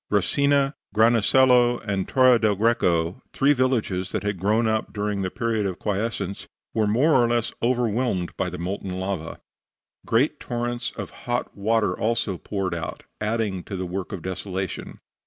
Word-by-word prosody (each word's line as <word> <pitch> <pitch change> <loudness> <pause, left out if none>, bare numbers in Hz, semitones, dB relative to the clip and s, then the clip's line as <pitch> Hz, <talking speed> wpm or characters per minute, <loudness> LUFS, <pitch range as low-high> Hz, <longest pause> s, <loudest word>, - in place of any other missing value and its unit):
Resina, 140 +8 +2 0.2
Granasello 120 +2 +5
and 100 -2 -1
Torre 130 -2 +5
del 110 -2 +2
Greco, 95 -3 +1
three 140 +2 +4
villages 115 -8 0
that - - -2
had 100 -3 -2
grown 110 +4 +2
up 110 0 0
during 105 -1 -2
the 95 - -1
period 110 -1 -1
of 95 - -4
quiescence, 105 -1 -3 0.3
were 110 -2 +2
more 130 +10 +3
or 120 -4 +5
less 120 -1 0
overwhelmed 120 -6 0
by 90 - -1
the 90 - -6
molten 95 +1 -4
lava. 95 -4 -4 0.6
Great 135 +6 +1
torrents 120 0 -3
of - - -6
hot 120 0 -3
water 110 +2 +1
also 110 -5 -1
poured 95 -4 -3
out, 85 -1 -5 0.2
adding 105 -3 -1
to 100 - -6
the 95 0 -3
work 90 +3 -4
of 95 -6 -6
desolation. 95 0 -4
105 Hz, 155 wpm, -24 LUFS, 95-120 Hz, 0.6 s, Granasello